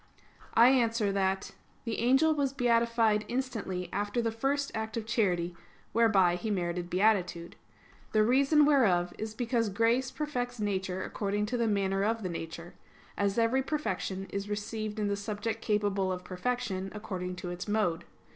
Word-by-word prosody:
I 235 +2 +8
answer 230 -5 +2
that, 190 -1 0 0.3
The 230 -2 -2
angel 265 +7 +4
was 280 -3 0
beatified 230 -4 +2
instantly 230 -8 -3
after 205 +3 -1
the 230 -1 0
first 275 +5 -1
act 220 0 -3
of 225 - -3
charity, 180 -7 0 0.4
whereby 195 -6 +4
he 220 +5 -4
merited 175 -3 -2
beatitude. 180 -3 +1 0.6
The 215 -1 +4
reason 275 +6 +4
whereof 190 -12 +3
is 220 0 -5
because 235 -2 0
grace 230 +6 +2
perfects 245 -5 -3
nature 190 -2 -2
according 205 0 -2
to 245 +4 -2
the 235 -1 +1
manner 195 -2 +1
of 225 +1 0
the 185 - -2
nature; 170 +1 -6 0.4
as 200 0 0
every 230 +3 +3
perfection 210 -9 -3
is 200 +1 -4
received 210 +1 -4
in 210 -1 0
the 200 - 0
subject 210 +2 -4
capable 205 -3 0
of 180 0 -4
perfection, 195 0 -3
according 185 -4 -4
to 180 -1 -6
its 175 +3 -6
mode. 205 -6 0
215 Hz, 155 wpm, -30 LUFS, 190-235 Hz, 0.6 s, I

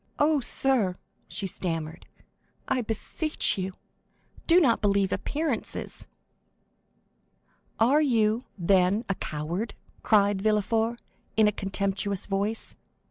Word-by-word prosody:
"Oh, 300 0 +3
sir," 240 -7 +1 0.3
she 200 - -3
stammered, 165 -3 -4 0.6
"I 260 -1 +1
beseech 240 +8 0
you, 190 0 -3 0.7
do 345 +1 +7
not 255 -10 +3
believe 200 -2 +2
appearances." 295 -5 -3 1.7
"Are 265 +7 +4
you, 230 -4 +2
then, 190 +4 +2
a - - +2
coward?" 170 +7 -4 0.3
cried 205 -2 +3
Villefort, 220 +2 +1 0.4
in 215 -1 +6
a - - +3
contemptuous 200 0 -2
voice. 205 +3 -2
210 Hz, 100 wpm, -27 LUFS, 195-235 Hz, 1.7 s, do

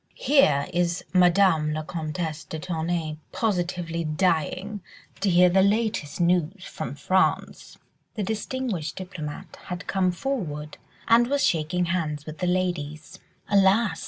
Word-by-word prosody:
Here 245 - +4
is 175 0 0
Madame 180 -4 +4
la 155 - -3
Comtesse 160 0 -4
de 160 - -6
Tournay 160 -2 -2
positively 175 -5 -1
dying 180 +5 0 0.4
to 195 - +1
hear 180 0 +6
the 185 +2 +4
latest 200 -7 0
news 175 +2 +1
from 125 - -6
France." 185 +6 0 0.4
The 215 - -2
distinguished 220 -5 -3
diplomatist 175 -6 -7
had 180 0 -5
come 185 -2 +1
forward 175 - -4 0.3
and 235 +1 +5
was 285 +2 +1
shaking 170 +2 +1
hands 155 -4 -2
with 155 0 -8
the 180 - -1
ladies. 175 -2 -2 0.3
"Alas!" 200 +2 +3
180 Hz, 130 wpm, -25 LUFS, 155-195 Hz, 0.4 s, hear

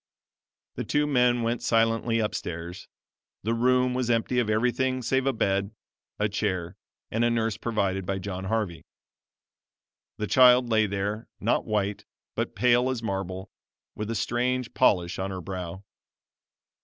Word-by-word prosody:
The - - -2
two 150 0 +1
men 125 -4 +3
went 115 +1 -1
silently 115 0 +2
up 105 -1 0
stairs. 85 +2 -6 0.6
The 115 +3 0
room 125 +2 +3
was 125 -1 -1
empty 120 +2 +1
of 115 -3 0
everything 125 +3 +1
save 130 +3 +1
a - - +4
bed, 100 -2 0 0.4
a 105 - +1
chair 95 -4 -2 0.4
and 115 +1 +1
a 120 - +4
nurse 115 -2 0
provided 100 -4 -1
by 95 +1 -2
John 95 -1 -5
Harvey. 100 -5 -2 1.3
The 105 - -2
child 125 +1 +6
lay 110 -2 +3
there, 100 +3 -3
not - - +1
white, 105 -1 -1 0.3
but - - -3
pale 125 +1 +3
as 125 -3 -3
marble, 95 -3 -4 0.4
with 105 0 -5
a 115 - -2
strange 125 +2 -1
polish 90 -9 +2
on 95 +1 -2
her 95 -1 -4
brow. 95 +1 -6
110 Hz, 150 wpm, -27 LUFS, 95-125 Hz, 1.3 s, child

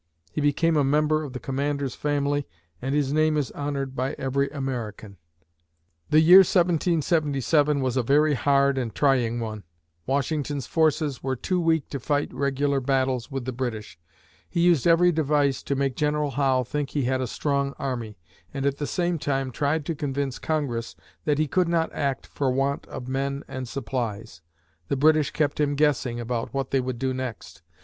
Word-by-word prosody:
He - - -2
became 155 +3 +2
a 145 - +4
member 150 +2 +2
of 140 -4 -7
the 130 - -5
Commander's 140 0 -2
family 145 -1 -1 0.3
and 135 +2 -1
his 145 -1 +1
name 155 0 +3
is 145 -3 -1
honored 140 -2 -4
by 130 +1 -1
every 140 +1 -1
American. 120 -8 -5 0.9
The 155 - +5
year 175 +4 +9
1777 155 -5 +2
was 130 -2 -1
a - - +3
very 150 +5 +3
hard 140 +1 +2
and 115 -4 -4
trying 125 -5 +2
one. 110 -3 -5 0.4
Washington's 140 0 -1
forces 155 -3 +1
were 130 0 -1
too 180 +8 -1
weak 165 -2 +1
to 140 - -4
fight 145 +3 -1
regular 140 0 0
battles 130 -2 0
with 135 -3 -4
the 130 - -2
British. 115 -8 -5 0.5
He 170 - 0
used 170 -4 +4
every 175 +1 +5
device 145 -3 +1
to 140 - -2
make 135 -2 0
General 150 -1 0
Howe 135 -1 +2
think 145 +3 -3
he 145 - -1
had 130 +1 0
a 130 - -1
strong 140 +2 -1
army, 120 -6 -4 0.3
and 135 0 -3
at 140 0 +1
the 145 - -3
same 175 -2 -1
time, 135 -2 -1
tried 145 +3 -1
to 165 - -1
convince 140 -3 -3
Congress 135 -7 -2 0.3
that 150 -2 +2
he 155 - +2
could 180 +5 +1
not 170 -1 0
act 140 -2 -2
for 140 -2 -2
want 135 +2 -1
of 125 - -7
men 140 +1 -2
and 130 -1 -5
supplies. 115 - -4 0.5
The 140 - -1
British 155 +1 +4
kept 150 -1 -1
him 145 -1 +1
guessing 140 -5 +1
about 120 +1 -3
what 135 -1 -2
they 135 - +3
would 130 -1 -3
do 130 +1 -1
next. 120 -10 -6
140 Hz, 180 wpm, -25 LUFS, 130-150 Hz, 0.9 s, year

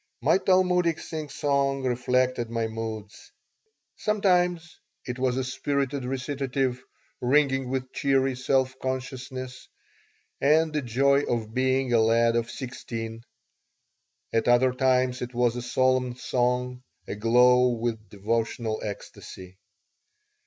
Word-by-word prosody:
My 155 +9 +3
Talmudic 180 -3 +2
singsong 140 -3 -1
reflected 125 -1 0
my 115 -1 -1
moods. 110 -2 -7 0.7
Sometimes 180 -5 +1 0.3
it 125 0 -5
was 130 -1 +1
a 130 - 0
spirited 140 +1 -2
recitative, 130 -1 -2 0.4
ringing 135 0 +2
with 130 -1 -3
cheery 135 -1 +1
self 130 0 +1
consciousness 130 0 -5 0.7
and 155 +3 +3
the 150 - 0
joy 140 +3 +2
of 110 -2 -2
being 130 0 +1
a 115 - +5
lad 115 +1 +3
of 115 -1 0
sixteen; 115 -3 -6 1.1
at 115 0 +1
other 125 +1 +4
times 130 -1 +1
it 125 0 -6
was 120 -1 +2
a 125 - -3
solemn 130 0 +1
song, 125 0 -1 0.3
aglow 125 +4 +4
with 115 -3 -3
devotional 110 +2 -2
ecstasy. 95 -2 -9
125 Hz, 110 wpm, -26 LUFS, 120-135 Hz, 1.1 s, a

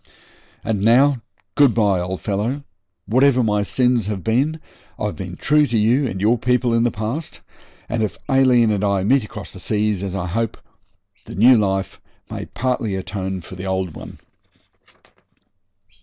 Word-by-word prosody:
And 105 -3 -1
now, 125 +4 +4 0.3
good 140 -5 +4
bye, 100 -5 +2
old 90 +1 -4
fellow. 115 +8 -2 0.4
Whatever 130 +3 +3
my 105 -2 +1
sins 125 0 +1
have 100 -4 -4
been, 140 +8 +1 0.4
I've - - -3
been - - -6
true 150 0 +3
to 120 - 0
you 120 +6 +2
and 95 -5 -5
your 110 +4 +2
people 125 0 +1
in 115 - +3
the 120 - +3
past, 115 +9 -5 0.5
and 115 +1 -2
if 105 -4 -2
Aileen 130 -5 +4
and 105 -1 -1
I 100 -2 +1
meet 130 +5 +3
across 105 -1 -9
the 95 - -10
seas, 105 0 -1
as 95 -1 -4
I 90 -3 -2
hope, 110 +5 -2 0.7
the - - -9
new 120 +7 +6
life 95 -3 -1 0.3
may - - -5
partly 120 -4 -2
atone 95 0 -4
for 85 - -12
the 95 +1 -7
old 95 -3 -2
one.' - - -10
110 Hz, 165 wpm, -20 LUFS, 100-125 Hz, 0.7 s, new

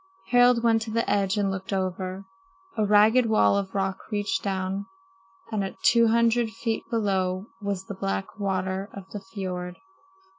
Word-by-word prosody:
Harald 245 -1 +5
went 225 -1 +3
to 220 - -5
the 230 +1 0
edge 195 0 +1
and 200 -1 +1
looked 190 +1 -5
over. 185 0 -3 0.5
A 220 - +1
ragged 215 +4 +5
wall 220 -2 +4
of 200 -1 -2
rock 195 -1 -1
reached 205 -1 -1
down, 195 0 -2 0.6
and 200 -3 -2
two 235 -1 +5
hundred 230 0 +3
feet 225 0 -3
below 190 -5 0 0.2
was 200 -2 -3
the 200 - -6
black 195 +2 -4
water 190 0 -2
of 195 -1 -9
the 205 - -5
fiord. 185 -2 -5
200 Hz, 155 wpm, -26 LUFS, 190-220 Hz, 0.6 s, Harald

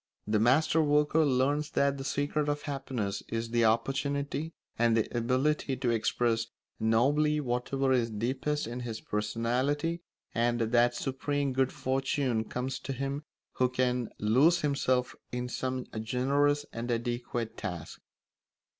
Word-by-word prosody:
The 105 0 +1
master 150 +8 +4
worker 150 +1 +3
learns 145 +2 +1
that 140 -2 +1
the - - -4
secret 145 +2 0
of 145 0 -2
happiness 130 -8 -3
is 115 0 -3
the 120 -1 +3
opportunity 140 +6 0 0.2
and 115 -1 +4
the 110 - +2
ability 130 +3 +1
to 125 -2 0
express 115 0 +1 0.3
nobly 145 +7 +3
whatever 135 +1 0
is 120 -2 +2
deepest 130 +7 -1
in 120 +2 -5
his 115 -3 -5
personality, 125 +10 -1 0.3
and 120 +1 +1
that 120 +1 +3
supreme 140 +2 -1
good 130 0 +2
fortune 130 -3 0
comes 125 +4 -3
to 135 - -4
him 140 +3 -3 0.3
who 125 0 +1
can 125 -1 0
lose 140 +12 +4
himself 130 -3 +1 0.2
in 125 0 -3
some 130 0 -3 0.2
generous 140 +5 +1
and 115 +1 -4
adequate 120 -1 -2
task. 90 -5 -6
130 Hz, 135 wpm, -30 LUFS, 115-145 Hz, 0.3 s, master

